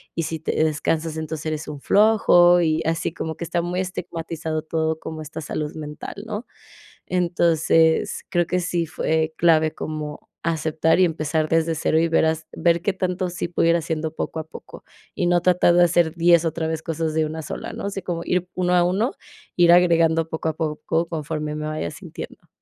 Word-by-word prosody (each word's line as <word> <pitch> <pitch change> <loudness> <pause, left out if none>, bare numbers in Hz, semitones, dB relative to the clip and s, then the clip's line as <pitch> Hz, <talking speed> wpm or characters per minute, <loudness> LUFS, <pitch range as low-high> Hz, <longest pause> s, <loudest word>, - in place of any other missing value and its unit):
y 165 - -1
si 160 +1 -4
te 155 - -2
descansas 160 +1 -1
entonces 155 0 -5
eres 155 0 -3
un 145 -2 -7
flojo 175 -5 +5
y 160 -1 +1
así 165 0 -1
como 160 -2 -4
que - - -6
está 170 +1 -1
muy 175 +2 -2
estigmatizado 165 -3 -4
todo 160 0 -1
como 160 -1 -7
esta 155 +1 -7
salud 150 0 -4
mental, 150 -1 -7
¿no?, 215 +2 -5 0.6
entonces, 165 -2 +2
creo 175 -1 +1
que 180 - 0
sí 175 -1 -1
fue 160 0 -1
clave 160 -2 +3
como 150 -1 -6 0.2
aceptar 160 +1 +1
y 185 - +6
empezar 155 -1 -1
desde 165 0 +2
0 160 +1 +1
y 165 - +2
ver 160 - +3
has 160 0 -1
ver 170 -1 +2
qué 200 0 0
tanto 185 -1 -2
sí 175 0 -3
puedo 170 -1 +2
ir 170 - +4
haciendo 160 -1 -3
poco 160 - -3
a 160 - -5
poco, 160 - -12 0.3
y 175 - 0
no 175 0 +3
tratar 175 -1 +4
de 175 - +6
hacer 170 -1 +2
10 170 0 +5
otra 160 0 -1
vez 160 -1 -3
cosas 160 -1 -2
de 160 0 +1
una 160 +1 -5
sola, - - -6
¿no?, - - -6
así 195 -1 -4
como 170 -1 -3
ir 180 0 -1
uno 180 -1 +1
a 175 - +5
uno, 195 +8 +1 0.5
ir 175 -1 +6
agregando 165 -2 +4
poco 160 0 -2
a - - -2
poco 160 +1 -1
conforme 155 -2 -4
me 155 0 -4
vaya 155 - -3
sintiendo. - - -10
165 Hz, 195 wpm, -23 LUFS, 155-175 Hz, 0.6 s, y